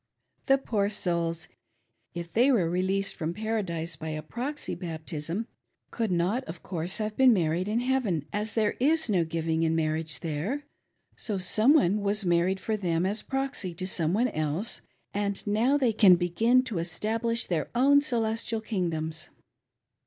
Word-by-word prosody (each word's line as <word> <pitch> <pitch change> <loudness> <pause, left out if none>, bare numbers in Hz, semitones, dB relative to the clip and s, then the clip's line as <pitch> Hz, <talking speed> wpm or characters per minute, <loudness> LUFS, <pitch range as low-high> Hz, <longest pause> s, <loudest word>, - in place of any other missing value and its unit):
The 270 - +6
pdor 210 -6 -1
souls, 170 -4 -1 0.7
if 170 -1 -6
they 250 +5 +5
were 200 -10 +3
released 190 +3 0
from 165 -1 -3
Paradise 185 -7 -2
by 155 +1 -6
a 155 0 -4
proxy 260 - -4
baptism, 165 +3 -4 0.5
could 225 -2 -1
not, 180 +9 +1
of 165 +1 -9
course, 175 0 -3
have 215 -1 -3
been 260 0 +6
married 175 -1 0
in 220 +3 0
heaven, 245 - 0
as 210 +1 -2
there 215 -2 +2
is 305 -1 +2
no 180 -4 +3
giving 160 0 -1
in 165 0 +2
marriage 155 0 -1
there; 170 - -2 0.5
so 210 -3 -3
some 215 +9 +4
one 210 - +3
was 200 0 0
married 175 +2 +2
for 220 - -1
them 175 -4 0
as 205 +3 -1
proxy 270 -10 -3
to 185 - -4
some 165 -4 0
one 245 +4 +2
else, 155 +8 -2 0.3
and 200 -1 -2
now 225 +7 +2
they 250 -5 +2
can 200 -4 +7
begin 220 +9 +3
to 220 -9 -3
establish 225 +7 -1
their 165 -4 -1
own 280 +3 +5
celestial 225 -4 -1
kingdoms." 165 -7 -3
195 Hz, 160 wpm, -28 LUFS, 165-230 Hz, 0.7 s, can